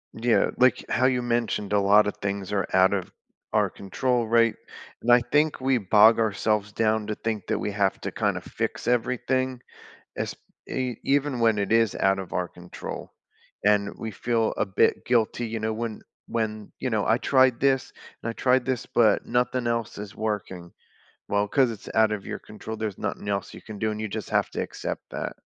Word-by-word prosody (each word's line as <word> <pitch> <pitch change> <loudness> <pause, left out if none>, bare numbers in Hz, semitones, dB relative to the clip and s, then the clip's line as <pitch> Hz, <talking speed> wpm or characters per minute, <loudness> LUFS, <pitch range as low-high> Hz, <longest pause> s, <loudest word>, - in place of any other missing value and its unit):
Yeah, 115 +1 +2
like, 130 0 +3
how 130 +1 +3
you 125 -1 +1
mentioned 115 -4 -1
a 105 - +4
lotta 105 +1 +5
things 100 -1 -4
are 100 - 0
out 95 +1 +5
of 95 -3 -3 0.4
our - - +3
control, 120 +4 -1
right? 115 0 +4 0.5
And 120 - +2
I 120 0 +7
think 150 0 +3
we 130 -1 +2
bog 110 +3 +6
ourselves 105 -1 0
down 110 -1 +1
to 105 - -2
think 110 -3 -3
that - - 0
we 105 - -2
have 100 -1 0
to - - -4
kinda - - 0
fix - - -4
everything 125 +1 0 0.6
es - - -2 0.3
e 125 -3 -2
even 140 -2 +1
when 115 -3 +3
it 100 +1 -2
is 115 -2 +4
out 95 0 +3
of 95 -2 -6
our 90 -1 -1
control, 90 0 -9 0.5
and 105 0 +3
we 110 - -4
feel 115 +2 0
a - - +1
bit 95 -1 +1
guilty, 120 0 +1
you 115 0 -4
know, 110 +1 -1
when 115 -1 -4 0.3
when 110 -2 -3
you 130 - -1
know, 110 -3 0
"I 115 +3 +3
tried 130 -3 +3
this 135 -1 +1 0.3
and 115 - -2
I - - -8
tried 125 0 +2
this, 130 -2 -2
but 110 -4 +3
nothing 125 0 0
else 115 -3 -2
is 105 0 -8
working." 100 -5 -4 0.6
"Well, 100 0 +1
'cause 130 -2 +3
it's 105 - -10
out 110 -1 +4
of 100 -2 -4
your - - -4
control, 110 +1 -8
there's 110 -3 -3
nothing 100 - -4
else 100 -2 -2
you - - -10
can 105 -2 -9
do, 110 - +1
and 105 0 -4
you 110 - -2
just 105 0 -5
have - - +2
to - - -3
accept - - -5
that." - - -4
110 Hz, 200 wpm, -26 LUFS, 105-120 Hz, 0.6 s, I